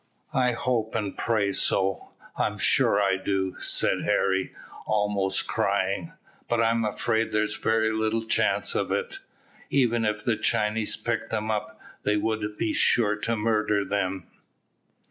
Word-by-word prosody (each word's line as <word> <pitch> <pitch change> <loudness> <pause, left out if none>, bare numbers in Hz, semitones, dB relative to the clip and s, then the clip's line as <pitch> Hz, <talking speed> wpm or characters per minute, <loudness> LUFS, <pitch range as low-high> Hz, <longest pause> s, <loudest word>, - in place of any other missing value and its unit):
"I 125 -1 +2
hope 115 -2 -1
and 105 -3 -2
pray 105 -4 0
so, 95 0 +1 0.3
I'm - - -1
sure 100 - +3
I 95 -2 +2
do," 95 -1 -2
said - - +1
Harry, 95 0 +1 0.4
almost 105 -2 +1
crying, 95 -3 -1 0.4
"but 120 - +1
I'm 115 0 +2
afraid 110 +1 0
there's 105 0 0
very 110 0 +1
little 110 +1 -1
chance - - +1
of - - -1
it. 465 -5 -2 0.5
Even 120 -4 +2
if 105 0 -1
the 115 -3 +1
Chinese 105 +1 0
picked 115 -1 -3
them 110 0 -2
up, 130 +5 -4 0.2
they 105 0 +1
would 105 -1 -2
be 110 - -1
sure 105 -3 +3
to 115 +2 -2
murder 105 -2 +1
them." 95 -2 -2
110 Hz, 145 wpm, -26 LUFS, 100-115 Hz, 0.5 s, sure